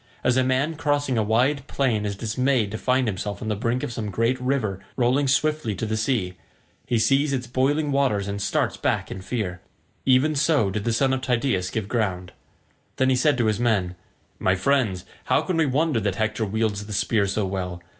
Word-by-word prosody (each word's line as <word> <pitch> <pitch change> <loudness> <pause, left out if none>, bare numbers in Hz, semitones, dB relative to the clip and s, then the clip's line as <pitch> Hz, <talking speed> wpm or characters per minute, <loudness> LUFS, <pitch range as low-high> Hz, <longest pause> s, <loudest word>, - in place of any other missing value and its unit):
As 125 - +3
a 130 - +3
man 130 +5 0
crossing 145 -3 0
a 110 - +2
wide 125 +6 +1
plain 115 -6 0
is 100 - -3
dismayed 115 +1 0
to 110 - -4
find 130 -1 +1
himself 100 0 -3
on 110 - -4
the 105 - 0
brink 115 +5 -1
of 120 - -3
some 110 -2 -4
great 115 +6 0
river 125 -7 -1 0.2
rolling 130 +3 +2
swiftly 150 -5 +1
to 105 - -3
the 110 0 -1
sea—he 110 +1 -3
sees 135 +5 +2
its 130 -2 -2
boiling 140 +4 0
waters 130 -8 +1
and 100 0 -4
starts - - 0
back - - -1
in 95 - -6
fear—even 125 - -1
so 145 -8 +2
did 105 +1 -3
the 115 - +1
son 135 +3 +2
of 130 - -1
Tydeus 120 -7 0
give 110 -1 -3
ground. 95 -6 -2 0.6
Then 130 0 +2
he - - +3
said 135 +2 +2
to 120 - +1
his 110 -2 +1
men, 105 -7 +1 0.5
"My 95 - +2
friends, 100 -4 +1 0.2
how - - +2
can 185 - -2
we 160 -2 +3
wonder 145 -1 +1
that 100 -3 -1
Hector 110 +1 -1
wields 105 0 -1
the 105 - -6
spear 100 0 +1
so 100 +1 -1
well? 90 -2 -4
115 Hz, 200 wpm, -24 LUFS, 100-130 Hz, 0.6 s, As